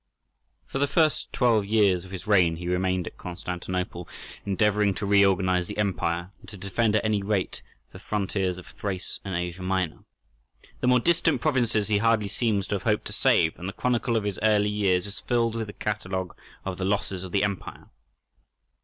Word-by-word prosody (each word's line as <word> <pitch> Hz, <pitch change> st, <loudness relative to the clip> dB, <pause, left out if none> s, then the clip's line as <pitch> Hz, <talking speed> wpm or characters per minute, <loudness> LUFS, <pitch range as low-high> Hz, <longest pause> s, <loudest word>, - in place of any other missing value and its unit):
For 135 Hz, -, -4 dB
the 140 Hz, -, +3 dB
first 155 Hz, 0 st, +1 dB
twelve 115 Hz, -4 st, +3 dB
years 100 Hz, -4 st, +2 dB
of -, -, -12 dB
his 95 Hz, 0 st, -7 dB
reign 90 Hz, -6 st, +4 dB
he 85 Hz, +1 st, -6 dB
remained 90 Hz, 0 st, 0 dB
at -, -, -9 dB
Constantinople, 90 Hz, -1 st, -4 dB, 0.4 s
endeavouring 105 Hz, 0 st, +2 dB
to 105 Hz, -, -3 dB
reorganize 95 Hz, -3 st, +3 dB
the -, -, -7 dB
empire, 90 Hz, -3 st, -1 dB
and -, -, -14 dB
to 105 Hz, -, -10 dB
defend 105 Hz, +3 st, 0 dB
at 110 Hz, -, +1 dB
any 105 Hz, -2 st, +1 dB
rate 100 Hz, -1 st, -1 dB, 0.3 s
the -, -, -11 dB
frontiers 95 Hz, -3 st, -1 dB
of 90 Hz, -, -10 dB
Thrace 95 Hz, -3 st, -5 dB
and 95 Hz, -3 st, -4 dB
Asia 90 Hz, +1 st, -3 dB
Minor. 90 Hz, -3 st, -1 dB, 0.8 s
The -, -, 0 dB
more 125 Hz, 0 st, +5 dB
distant 170 Hz, +6 st, +2 dB
provinces 120 Hz, -8 st, +1 dB
he 105 Hz, -2 st, +2 dB
hardly 110 Hz, -2 st, +2 dB
seems 105 Hz, -3 st, 0 dB
to 105 Hz, -, +1 dB
have 95 Hz, -, -3 dB
hoped 105 Hz, -2 st, 0 dB
to -, -, -5 dB
save, 80 Hz, -1 st, +3 dB
and 90 Hz, +2 st, -4 dB
the -, -, -7 dB
chronicle 120 Hz, 0 st, 0 dB
of 110 Hz, -, -1 dB
his 100 Hz, -2 st, -3 dB
early 105 Hz, -1 st, +3 dB
years 95 Hz, -4 st, +1 dB
is 100 Hz, 0 st, -6 dB
filled 115 Hz, -2 st, +1 dB
with 115 Hz, -1 st, -3 dB
the 105 Hz, -, -8 dB
catalogue 95 Hz, -3 st, -3 dB, 0.3 s
of 95 Hz, -1 st, -4 dB
the -, -, -2 dB
losses 95 Hz, -2 st, -1 dB
of 95 Hz, -, -7 dB
the 100 Hz, -, +2 dB
empire. 100 Hz, -2 st, -4 dB
100 Hz, 190 wpm, -26 LUFS, 90-110 Hz, 0.8 s, more